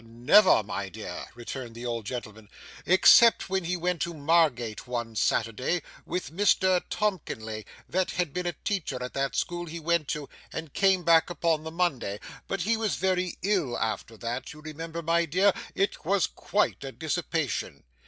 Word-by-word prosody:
'Never, 120 Hz, -, +5 dB
my 100 Hz, -2 st, -4 dB
dear,' -, -, -7 dB
returned 120 Hz, 0 st, -7 dB
the 120 Hz, +1 st, -7 dB
old 115 Hz, -3 st, -3 dB
gentleman, 110 Hz, -4 st, -7 dB, 0.4 s
'except 190 Hz, +3 st, +6 dB
when 190 Hz, -2 st, 0 dB
he 180 Hz, +2 st, -1 dB
went 175 Hz, -1 st, -1 dB
to 170 Hz, +1 st, -2 dB
Margate 145 Hz, -9 st, +1 dB
one 120 Hz, -2 st, -4 dB
Saturday 115 Hz, +11 st, 0 dB, 0.2 s
with 180 Hz, -3 st, -3 dB
Mr 185 Hz, 0 st, +3 dB
Tomkinley 110 Hz, -, -3 dB, 0.2 s
that 185 Hz, 0 st, 0 dB
had 175 Hz, -6 st, -2 dB
been 180 Hz, -1 st, -2 dB
a 175 Hz, -, -1 dB
teacher 185 Hz, -10 st, -2 dB
at 125 Hz, -, -6 dB
that 135 Hz, 0 st, -1 dB
school 175 Hz, 0 st, -2 dB
he 165 Hz, +1 st, -6 dB
went 165 Hz, -2 st, +1 dB
to, 150 Hz, -1 st, -3 dB, 0.2 s
and 160 Hz, -3 st, -6 dB
came 190 Hz, -2 st, +3 dB
back 165 Hz, 0 st, +5 dB
upon 165 Hz, -3 st, 0 dB
the 160 Hz, -, -5 dB
Monday; 145 Hz, -, -1 dB, 0.3 s
but 195 Hz, -, -2 dB
he 220 Hz, +6 st, +2 dB
was 220 Hz, -2 st, -1 dB
very 185 Hz, -1 st, 0 dB
ill 180 Hz, -11 st, +1 dB
after 110 Hz, +1 st, -3 dB
that, 120 Hz, +3 st, -4 dB
you 150 Hz, -, -13 dB
remember, 165 Hz, +2 st, -6 dB
my 170 Hz, +1 st, +2 dB
dear; 185 Hz, +5 st, +3 dB, 0.2 s
it 195 Hz, -, 0 dB
was 195 Hz, +3 st, +2 dB
quite 210 Hz, -7 st, -1 dB
a 135 Hz, -, -5 dB
dissipation. 160 Hz, -, -2 dB
165 Hz, 170 wpm, -27 LUFS, 125-180 Hz, 0.4 s, except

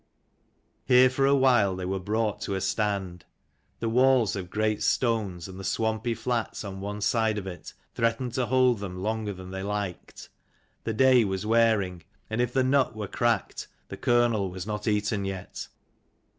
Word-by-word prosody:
Here 125 Hz, 0 st, +5 dB
for 135 Hz, +1 st, +2 dB
a 140 Hz, -, +5 dB
while 120 Hz, -8 st, +3 dB
they 90 Hz, 0 st, -5 dB
were 95 Hz, +1 st, -2 dB
brought 105 Hz, +2 st, -1 dB
to 100 Hz, -, -2 dB
a 95 Hz, -, -2 dB
stand: 95 Hz, -4 st, -2 dB, 0.6 s
the 115 Hz, -, -2 dB
walls 125 Hz, -2 st, +3 dB
of 90 Hz, -3 st, -5 dB
great 110 Hz, +1 st, 0 dB
stones, 105 Hz, -8 st, 0 dB
and 95 Hz, 0 st, -10 dB
the -, -, -7 dB
swampy 110 Hz, +3 st, -1 dB
flats 120 Hz, -3 st, -2 dB
on 95 Hz, -2 st, -7 dB
one 105 Hz, +1 st, -5 dB
side 110 Hz, 0 st, +1 dB
of 100 Hz, -, -4 dB
it, 90 Hz, -2 st, -8 dB, 0.2 s
threatened 115 Hz, +1 st, -1 dB
to 125 Hz, -1 st, 0 dB
hold 130 Hz, -3 st, +3 dB
them 95 Hz, -3 st, -6 dB
longe'r 110 Hz, -1 st, -2 dB
than 95 Hz, 0 st, -10 dB
they 95 Hz, 0 st, -5 dB
liked. 100 Hz, -3 st, -5 dB, 0.6 s
The 110 Hz, -, -1 dB
day 130 Hz, +1 st, +5 dB
was 95 Hz, 0 st, -2 dB
wearing, 110 Hz, -6 st, +2 dB, 0.3 s
and 110 Hz, +2 st, 0 dB
if 125 Hz, -1 st, 0 dB
the 130 Hz, +1 st, +2 dB
nut 130 Hz, -2 st, +2 dB
were 105 Hz, -2 st, -4 dB
cracked 120 Hz, -3 st, -1 dB, 0.2 s
the -, -, -6 dB
kernel 120 Hz, -5 st, +2 dB
was 90 Hz, 0 st, -6 dB
not 105 Hz, +1 st, -4 dB
eaten 105 Hz, -1 st, 0 dB
yet. 95 Hz, -1 st, -6 dB
110 Hz, 175 wpm, -27 LUFS, 95-120 Hz, 0.6 s, Here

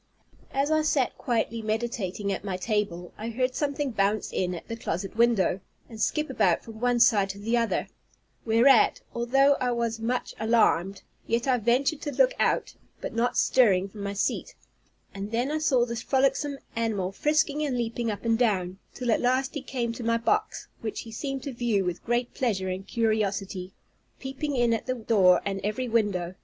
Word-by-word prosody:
As 275 Hz, +3 st, 0 dB
I 310 Hz, 0 st, +3 dB
sat 295 Hz, -4 st, +1 dB
quietly 230 Hz, -1 st, -1 dB
meditating 215 Hz, -3 st, -2 dB
at 190 Hz, -, -5 dB
my 190 Hz, -3 st, -3 dB
table, 185 Hz, -4 st, -2 dB
I 220 Hz, +2 st, -4 dB
heard 255 Hz, +2 st, -1 dB
something 285 Hz, 0 st, -1 dB
bounce 205 Hz, 0 st, 0 dB
in 180 Hz, -1 st, -1 dB
at 165 Hz, -, -9 dB
the 230 Hz, -, -4 dB
closet 195 Hz, -3 st, -4 dB
window, 230 Hz, -6 st, +3 dB, 0.3 s
and 220 Hz, -2 st, -9 dB
skip 305 Hz, +7 st, +1 dB
about -, -, +1 dB
from 225 Hz, -2 st, -10 dB
one 245 Hz, 0 st, +2 dB
side 215 Hz, -5 st, +4 dB
to 195 Hz, -, -5 dB
the 225 Hz, +4 st, -1 dB
other; 230 Hz, -1 st, 0 dB, 0.6 s
whereat, 230 Hz, +3 st, +4 dB
although 270 Hz, +4 st, +3 dB
I 250 Hz, -1 st, 0 dB
was 230 Hz, -1 st, -1 dB
much 245 Hz, +3 st, -2 dB
alarmed, 205 Hz, -4 st, +2 dB, 0.2 s
yet 230 Hz, +3 st, 0 dB
I 255 Hz, -2 st, +3 dB
ventured 255 Hz, +7 st, +1 dB
to 290 Hz, -, -4 dB
look -, -, +4 dB
out, -, -, +1 dB, 0.3 s
but -, -, -5 dB
not 235 Hz, +2 st, 0 dB
stirring 200 Hz, -7 st, +3 dB
from 205 Hz, +1 st, -10 dB
my 200 Hz, 0 st, -3 dB
seat; 200 Hz, -, -2 dB, 0.6 s
and 200 Hz, +1 st, -5 dB
then 240 Hz, +5 st, -1 dB
I 310 Hz, -, 0 dB
saw 260 Hz, -6 st, +3 dB
this 235 Hz, -1 st, -4 dB
frolicsome 275 Hz, +2 st, +1 dB, 0.2 s
animal 215 Hz, -5 st, -1 dB
frisking 300 Hz, +5 st, +1 dB
and 270 Hz, -4 st, -1 dB
leaping 235 Hz, 0 st, -2 dB
up 210 Hz, +2 st, -5 dB
and 230 Hz, 0 st, +2 dB
down, 190 Hz, -6 st, 0 dB, 0.2 s
till 245 Hz, -2 st, -1 dB
at -, -, +2 dB
last 255 Hz, +2 st, +1 dB
he 290 Hz, -, -4 dB
came 245 Hz, -3 st, -3 dB
to 235 Hz, -, -7 dB
my 230 Hz, 0 st, +2 dB
box, 420 Hz, -, -1 dB
which 220 Hz, -2 st, -4 dB
he 225 Hz, -, -10 dB
seemed 270 Hz, +3 st, -4 dB
to 280 Hz, -, -5 dB
view 230 Hz, -5 st, 0 dB
with 180 Hz, -1 st, -3 dB
great 240 Hz, +1 st, -1 dB
pleasure 195 Hz, -7 st, -1 dB
and 185 Hz, +1 st, -5 dB
curiosity, 200 Hz, -5 st, -1 dB, 0.5 s
peeping 270 Hz, +2 st, -4 dB
in 240 Hz, -2 st, +3 dB
at 225 Hz, -, -3 dB
the 255 Hz, -, 0 dB
door 200 Hz, -6 st, +4 dB
and 195 Hz, -1 st, -2 dB
every 215 Hz, +5 st, -2 dB
window. 205 Hz, -6 st, 0 dB
230 Hz, 190 wpm, -27 LUFS, 200-255 Hz, 0.6 s, side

